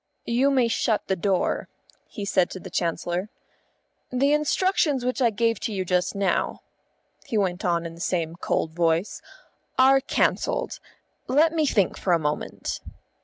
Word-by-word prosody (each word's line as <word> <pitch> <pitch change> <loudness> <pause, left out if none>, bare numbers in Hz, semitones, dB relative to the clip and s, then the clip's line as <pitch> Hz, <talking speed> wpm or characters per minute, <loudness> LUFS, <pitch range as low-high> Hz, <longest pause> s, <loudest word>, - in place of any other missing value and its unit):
"You 250 +4 +2
may 260 -4 +3
shut 225 -1 0
the 190 - 0
door," 190 0 0 0.4
he 205 - -6
said 185 -3 +2
to 185 - -7
the 185 0 -10
Chancellor. 175 +2 -2 0.8
"The 275 +3 +2
instructions 300 -3 +1
which 255 +2 -1
I 240 - +5
gave 230 +1 0
to - - -3
you 190 -2 -2
just 180 +1 0
now," 200 -1 0 0.6
he 225 - -1
went 185 -3 0
on 170 -2 +1
in 165 - -6
the 170 - -11
same 170 -3 -1
cold 160 -2 -1
voice, 165 +2 0 0.6
"are 270 +1 +6
cancelled. - - 0 0.5
Let 305 +6 +4
me 315 -2 +1
think 200 -8 +1
for 180 - +1
a - - +5
moment." 150 -1 -3
200 Hz, 160 wpm, -25 LUFS, 175-260 Hz, 0.8 s, are